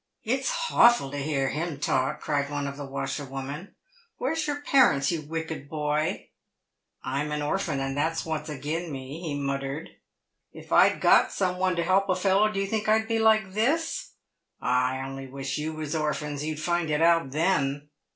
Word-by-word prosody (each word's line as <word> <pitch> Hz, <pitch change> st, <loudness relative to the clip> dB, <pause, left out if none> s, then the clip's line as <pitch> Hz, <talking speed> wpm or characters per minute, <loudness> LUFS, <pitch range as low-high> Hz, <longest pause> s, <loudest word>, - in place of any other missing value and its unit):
"It's -, -, 0 dB
hawful 240 Hz, -, +4 dB
to 145 Hz, -, -4 dB
hear 140 Hz, -2 st, 0 dB
him 155 Hz, -1 st, -3 dB
talk," 130 Hz, -2 st, 0 dB
cried 140 Hz, -2 st, -1 dB
one 145 Hz, -1 st, -2 dB
of 140 Hz, 0 st, -4 dB
the 140 Hz, -1 st, -7 dB
washerwomen; 135 Hz, +4 st, -5 dB, 0.2 s
" 470 Hz, -1 st, -33 dB
where's 305 Hz, +4 st, -1 dB
your 290 Hz, 0 st, -2 dB
parents, 255 Hz, -, +4 dB
you 165 Hz, -2 st, -2 dB
wicked 160 Hz, -2 st, -5 dB
boy 150 Hz, 0 st, -1 dB, 0.2 s
?" -, -, -56 dB
" -, -, -47 dB
I 135 Hz, +2 st, -1 dB
am 150 Hz, 0 st, -3 dB
an 150 Hz, 0 st, -2 dB
orphan, 155 Hz, -2 st, -1 dB
and 135 Hz, 0 st, -2 dB
that's 160 Hz, +3 st, -1 dB
what's 160 Hz, -1 st, -3 dB
agin' 155 Hz, +4 st, -3 dB
me," 135 Hz, +4 st, -7 dB
he 155 Hz, -5 st, -3 dB
muttered. 140 Hz, +2 st, -3 dB, 0.3 s
" -, -, -52 dB
If -, -, -13 dB
I'd -, -, +5 dB
got -, -, +5 dB
some 180 Hz, -2 st, -1 dB
one 185 Hz, -1 st, +2 dB
to 170 Hz, -, 0 dB
help 195 Hz, +2 st, +2 dB
a 185 Hz, -, +3 dB
fellow, 195 Hz, +3 st, +3 dB
do 195 Hz, -, -2 dB
you 195 Hz, -, +1 dB
think 215 Hz, +1 st, -1 dB
I'd 220 Hz, +1 st, +3 dB
be 225 Hz, 0 st, 0 dB
like 220 Hz, -3 st, +3 dB
this? 325 Hz, -, 0 dB, 0.5 s
Ah, 125 Hz, +1 st, +1 dB
I 130 Hz, 0 st, -4 dB
only 135 Hz, 0 st, -7 dB
wish 135 Hz, +1 st, -4 dB
you 155 Hz, +1 st, -2 dB
was 155 Hz, -2 st, -4 dB
orphans, 150 Hz, -2 st, -2 dB
you'd 155 Hz, 0 st, -3 dB
find 175 Hz, 0 st, 0 dB
it 150 Hz, +1 st, +2 dB
out 165 Hz, -4 st, +4 dB
then." 145 Hz, -2 st, 0 dB
155 Hz, 200 wpm, -27 LUFS, 140-190 Hz, 0.5 s, I'd